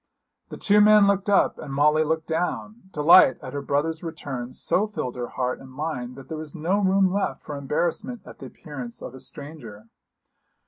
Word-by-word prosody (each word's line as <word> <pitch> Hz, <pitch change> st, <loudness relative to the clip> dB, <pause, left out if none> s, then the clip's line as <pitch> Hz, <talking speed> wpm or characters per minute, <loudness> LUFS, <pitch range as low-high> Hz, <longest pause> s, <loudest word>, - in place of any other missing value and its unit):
The -, -, -8 dB
two 210 Hz, 0 st, +4 dB
men 210 Hz, -1 st, +7 dB
looked 200 Hz, 0 st, +1 dB
up, 200 Hz, -, +3 dB
and 140 Hz, -, -7 dB
Molly 150 Hz, +3 st, +3 dB
looked 160 Hz, +1 st, -1 dB
down. 180 Hz, +5 st, -3 dB
Delight 150 Hz, -3 st, +6 dB
at 130 Hz, -, -7 dB
her 140 Hz, -, -3 dB
brother's 150 Hz, +4 st, -1 dB
return 140 Hz, -7 st, -6 dB
so 205 Hz, +9 st, 0 dB
filled 130 Hz, -, -5 dB
her 120 Hz, -1 st, -4 dB
heart 125 Hz, -1 st, -3 dB
and 135 Hz, -, -12 dB
mind 130 Hz, -3 st, -4 dB
that 135 Hz, -1 st, -12 dB
there 160 Hz, -1 st, -5 dB
was 155 Hz, +1 st, -8 dB
no 175 Hz, +5 st, 0 dB
room 190 Hz, -1 st, +3 dB
left 200 Hz, -, -2 dB
for 150 Hz, -, -6 dB
embarrassment 175 Hz, -, -2 dB
at -, -, -13 dB
the -, -, -8 dB
appearance 135 Hz, -7 st, -8 dB
of -, -, -7 dB
a 130 Hz, -, -10 dB
stranger. 125 Hz, -9 st, -9 dB
155 Hz, 190 wpm, -24 LUFS, 135-190 Hz, -, men